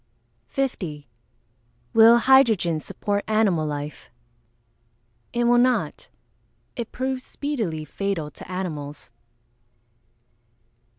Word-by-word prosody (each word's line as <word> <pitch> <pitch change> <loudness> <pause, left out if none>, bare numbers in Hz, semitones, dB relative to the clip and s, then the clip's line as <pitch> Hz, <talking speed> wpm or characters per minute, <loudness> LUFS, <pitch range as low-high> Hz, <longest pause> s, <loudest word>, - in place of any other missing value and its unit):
50. 175 - -3 0.9
Will 225 +1 +8
hydrogen 230 - +4
support 205 +5 -2
animal 205 -8 +2
life? 145 0 -6 1.2
It 240 - 0
will 240 0 +4
not. 250 0 0 0.7
It 235 -2 -5
proves 260 0 -3
speedily 220 - -3
fatal 180 -5 -3
to 175 - -12
animals. 155 -6 -5
205 Hz, 80 wpm, -24 LUFS, 155-240 Hz, 1.2 s, Will